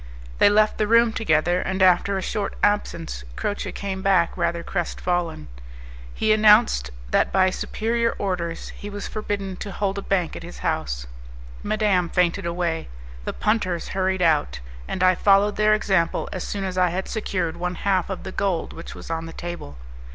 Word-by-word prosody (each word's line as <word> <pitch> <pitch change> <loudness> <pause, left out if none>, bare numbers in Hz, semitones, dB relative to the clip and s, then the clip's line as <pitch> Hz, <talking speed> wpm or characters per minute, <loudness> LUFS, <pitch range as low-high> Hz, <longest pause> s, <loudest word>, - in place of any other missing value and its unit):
They - - +7
left 215 +1 +3
the 215 - +2
room 230 0 +5
together, 175 -4 +2
and 190 0 -2
after 185 +1 +4
a 190 - -3
short 210 +1 -2
absence 170 - 0
Croce 205 - -3
came 190 -1 -4
back 185 -3 +2
rather 170 -1 -1
crestfallen; 175 - -2 0.6
he 215 - +2
announced 215 - +5 0.2
that - - +2
by 185 -1 +3
superior 230 +4 -1
orders 175 -4 -3
he 205 - -8
was 205 0 -5
forbidden 200 -3 -4
to 200 - -6
hold 200 0 -2
a - - -5
bank 185 -4 -1
at - - -7
his 175 +1 -9
house. - - -1 0.6
Madame 200 -5 +1
fainted 180 +1 +1
away, 170 -1 -2 0.4
the - - -3
punters 185 -6 0
hurried 190 -1 0
out, 155 - +2 0.3
and 185 - -2
I 185 0 +6
followed 200 +2 +4
their 215 0 +4
example, 190 -5 +1
as 185 - -4
soon 200 -1 -4
as 185 -1 -2
I 180 -1 +4
had 185 +3 -3
secured 185 -6 -2
one 180 +1 -3
half 190 -1 0
of 190 - -5
the 190 - -6
gold 185 -4 -1
which 165 - -9
was - - -8
on 165 0 -3
the 165 - -9
table. 175 - -7
190 Hz, 175 wpm, -23 LUFS, 170-205 Hz, 0.6 s, They